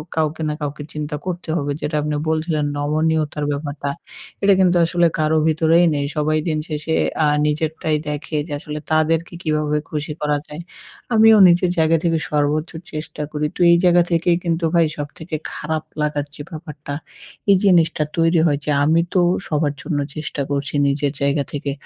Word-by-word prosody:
কাউকে 160 0 -1
না 150 - -1
কাউকে 145 0 -4
চিন্তা 150 0 -4
করতে 180 -2 -5
হবে। 145 -3 -1
যেটা 155 - -2
আপনি 150 0 -2
বলছিলেন 155 -1 0
নমনীয়তার 155 0 0
ব্যাপারটা। 145 0 -4 0.5
এটা 200 - +6
কিন্তু 180 -1 +4
আসলে 175 0 +2
কারো 155 +1 +2
ভিতরেই 160 +2 +4
নেই। 140 0 -1
সবাই 155 +1 +1
দিন 155 -2 0
শেষে 155 +1 -2 0.3
আ - - +4 0.2
নিজেরটাই 155 +1 -1
দেখে 150 +1 -4
যে - - -10
আসলে 150 +1 -6
তাদেরকে 160 +2 +1
কীভাবে 150 -2 0
খুশি 150 0 -4
করা 150 -1 +1
যায়? 150 +3 -8 0.5
আমিও 220 0 +7
নিজের 175 +1 +4
জায়গা 160 0 +4
থেকে 165 -2 +1
সর্বোচ্চ 150 +2 +1 0.2
চেষ্টা 155 0 -5
করি। 150 0 -2
তো - - -12
এই 170 - +6
জায়গা 175 -1 +5
থেকেই 170 +1 +2
কিন্তু 165 0 0
ভাই 170 -1 +5
সবথেকে 155 +2 -6 0.2
খারাপ 155 0 -3 0.2
লাগার 150 -1 -1
যে 145 - -8
ব্যাপারটা 150 -3 -8 0.6
এই 195 - +7
জিনিসটা 170 -5 +3
তৈরি 165 +1 +3
হয় 145 -2 +1
যে 150 - 0
আমি 160 +3 +4
তো 185 - +3 0.3
সবার 150 -2 0
জন্য 150 -4 -2 0.2
চেষ্টা 150 -2 -4
করছি 140 0 -2
নিজের 140 0 0
জায়গা 140 +1 +1
থেকে। 140 -1 -3
155 Hz, 170 wpm, -20 LUFS, 150-165 Hz, 0.6 s, আমিও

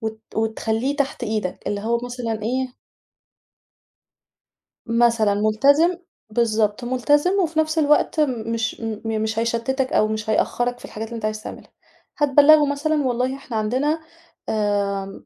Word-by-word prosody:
وت 220 -1 -5
وتخلّيه 225 +4 -1
تحت 280 -3 -2
إيدك، 215 -4 -3
اللي 205 0 -2
هو 235 +3 0
مثلًا 235 -3 -4
إيه 255 +2 -2 2.1
مثلًا، 230 -3 +3
مُلتزم 280 - +3 0.3
بالضبط 220 0 0
مُلتزم 290 +7 +2
وفي 330 -3 0
نفس 315 +1 0
الوقت 300 +1 +2
مش 230 -6 -1
م 220 -2 -4 0.2
مش 220 0 -1
هيشتِتك، 235 +3 -1
أو 215 - +3
مش 215 0 -4
هيأخّرك 245 +3 0
في - - -10
الحاجات 220 +1 -6
اللي 235 - -8
أنت 220 - -4
عايز 215 0 -3
تعملها. - - -10 0.5
هتبَلّغه 290 +1 +6
مثلًا، 300 +1 0
والله 250 +2 0
إحنا 240 -5 -6
عندنا، 260 +9 0 0.5
آمم 200 -2 -1
235 Hz, 135 wpm, -22 LUFS, 215-275 Hz, 2.1 s, هتبَلّغه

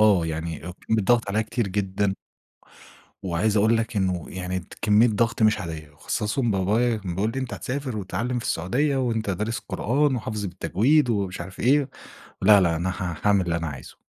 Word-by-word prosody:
آه، 100 -6 +5
يعني 80 0 -3
وكان 90 +5 -2
بيتضغط 115 0 +2
عليّا 105 +3 +1
كتير 110 -1 -2
جدًا. 95 0 -1 1.1
وعايز 95 +4 0
أقول 110 +3 +4
لك 115 -1 -2
إنه 95 -3 0
يعني 95 0 -4
ت 85 - -13
كمّية 105 +3 +5
ضغْط 115 +2 0
مش 110 -1 +4
عادية، 80 -3 -6
وأخصّصهم 105 - -1
بابايا 110 +5 +1
كان 95 -5 -5
بيقول 105 +4 0
لي: 135 - -3
"أنت 130 -2 -4
هتسافر 130 -3 -4
وتتعلّم 105 +6 -2
في - - -7
السعودية 135 - 0
وأنت 115 -5 -1
دارس 105 +5 -2
قرآن 135 +3 0
وحافظه 110 -3 -3
بالتجويد." 120 - +2
ومش 100 -5 -1
عارف 95 +2 -9
إيه. 140 +3 +3 0.5
لا، 100 +1 +7
لا، 85 -2 +2
أنا 85 +3 -1
ها 95 -4 -4
هاعمل 100 -2 +4
اللي 85 - 0
أنا 85 -1 -3
عايزه. 65 -4 -9
105 Hz, 185 wpm, -24 LUFS, 90-115 Hz, 1.1 s, لا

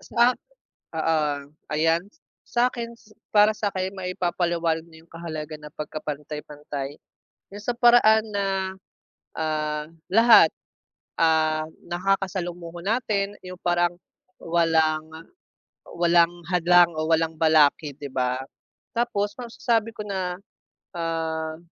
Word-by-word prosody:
Sa 240 +1 +3 0.7
oo 160 -1 +2 0.4
ayan. 165 +2 +2 0.5
Sa 245 +1 +2
akin, 235 -1 -6 0.4
para 210 +1 +6
sa'kin 195 -3 -2
maipapaliwanag 175 -3 -1
nyo 160 -1 -16
yung - - -32
kahalagan 155 -2 -6
ng 150 - -14
pagkapantay-pantayn 150 -1 -6 0.6
yung 205 - -8
sa 245 - 0
paraan 235 -3 +6
na, 200 -2 -2 0.9
ah, 155 -1 -2 0.2
lahat, 225 -2 +7 0.7
ah, 155 -1 +3 0.2
nakakasalumuho 175 -2 -2
natin, 205 0 -1
yung 185 0 -8
parang 175 0 +1 0.4
walang 160 -2 +2 0.9
walang 170 0 +4 0.2
hadlang 175 -1 +5
o 155 - -1
walang 160 0 +2
balakid 155 -2 +3
'di 145 - -5
ba? 130 -1 -1 0.6
Tapos 210 -4 0
masasabi 230 -2 -1
ko 210 -2 -7
na, 185 -2 -3 0.6
ah 160 -1 -2
170 Hz, 100 wpm, -25 LUFS, 155-200 Hz, 0.9 s, lahat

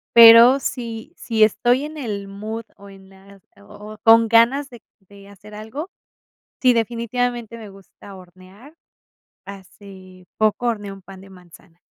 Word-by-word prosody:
Pero 235 +3 +8
si 235 +2 -7
si 220 -2 0
estoy 245 +6 +1
en 310 +1 -10
el 205 -7 -6
mood, 215 +3 -8
o 200 0 -15
en 195 -1 -17
las, 195 0 -20 0.2
o 210 +1 -14
o - - -15
con 225 0 +5
ganas 235 +5 +2
de 240 -3 -16 0.2
de 200 +1 -19
hacer 210 +1 -16
algo, 245 - -8 0.7
sí 250 -2 +3
definitivamente 235 0 -3
me 220 -3 -12
gusta 195 0 -16
hornear. 185 - -17 0.7
Hace 190 -1 -15
poco 215 +3 -1
horneé 210 -4 -4
un 195 0 -12
pan 190 0 -14
de 195 - -16
manzana. 180 -1 -19
210 Hz, 150 wpm, -19 LUFS, 195-235 Hz, 0.7 s, Pero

